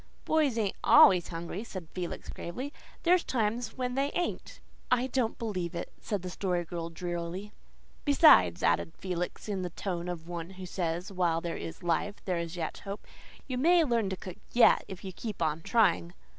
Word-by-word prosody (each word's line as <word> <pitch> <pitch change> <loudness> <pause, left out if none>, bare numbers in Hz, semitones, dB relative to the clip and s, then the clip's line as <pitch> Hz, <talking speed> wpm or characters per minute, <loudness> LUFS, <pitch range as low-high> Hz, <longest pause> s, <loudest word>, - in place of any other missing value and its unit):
"Boys 300 -7 +2
ain't 210 -4 0
ALWAYS 180 -3 +7
hungry," 170 +4 -5
said 185 -7 -7
Felix 180 -2 -5
gravely. 255 - -5 0.3
"There's 360 0 +4
times 225 0 -1
when 250 -1 -1
they 275 +2 +1
ain't." 350 - -3 0.3
"I 250 0 +3
don't 250 -3 0
believe 185 -6 -3
it," 170 - -5
said 205 -4 -3
the 180 - -4
Story 180 -2 -1
Girl 165 0 -5
drearily. 175 +3 -4 0.5
"Besides," 275 - +6
added 85 - +2
Felix 180 0 -4
in 200 -3 -2
the 180 - -3
tone 175 0 -4
of 170 -2 -6
one 170 -1 -5
who 185 - -6
says 175 +1 -3
while 175 -3 +1
there 170 0 -4
is 165 +2 -7
life 175 +4 0
there 180 -3 0
is 170 +1 -4
yet 165 -2 -3
hope, 200 +1 -7 0.4
"you 255 -2 -3
may 340 +4 +5
learn 235 -8 +1
to 190 - -3
cook 180 0 -8 0.2
yet 240 - +6
if 190 -2 -8
you 190 -1 -6
keep 215 +2 -6
on 160 -1 0
trying." 180 -5 +2
185 Hz, 185 wpm, -30 LUFS, 170-230 Hz, 0.5 s, ALWAYS